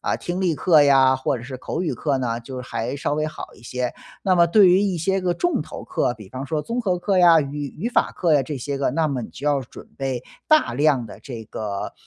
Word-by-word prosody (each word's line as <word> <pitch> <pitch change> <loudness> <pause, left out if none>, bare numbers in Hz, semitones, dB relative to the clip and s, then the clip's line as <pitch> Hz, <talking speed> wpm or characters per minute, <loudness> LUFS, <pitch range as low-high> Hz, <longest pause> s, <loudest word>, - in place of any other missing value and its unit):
啊， - - -1
听 175 +2 -4
力 175 -4 +1
课 160 -5 +5
呀， 135 -2 +5
或 130 0 -1
者 115 - -9
是 130 0 -7
口 160 +6 -4
语 170 - -1
课 135 +2 -1
呢， 115 -2 -1
就 130 +1 -7
还 120 +1 -4
稍 145 0 -1
微 155 +1 -1
好 155 - -8
一 - - -19
些。 125 0 -3 0.3
那 185 -1 +3
么 170 0 +6
对 195 +2 +6
于 185 +2 +5
一 195 -3 0
些 190 +4 0
个 180 -1 0
重 350 - 0
头 - - -9
课， 120 - -1
比 105 -4 -13
方 130 +5 -6
说 155 0 -2
综 240 +2 -3
合 185 -5 0
课 190 +2 0
呀， 170 -3 +7
语 145 0 -4
语 210 +9 -2
法 245 - +1
课 170 -3 +1
呀 145 - +5
这 140 +2 -4
些 140 +2 -4
个， 140 - +1
那 160 +1 +1
么 135 -3 -2
你 - - -7
就 140 - -10
要 145 -2 +2
准 125 - -12
备 130 -3 -3 0.3
大 310 - +4
量 140 -3 +2
的 - - -11
这 120 -5 -8
个， 100 -3 -5
145 Hz, 280 characters per minute, -22 LUFS, 130-175 Hz, 0.3 s, 呀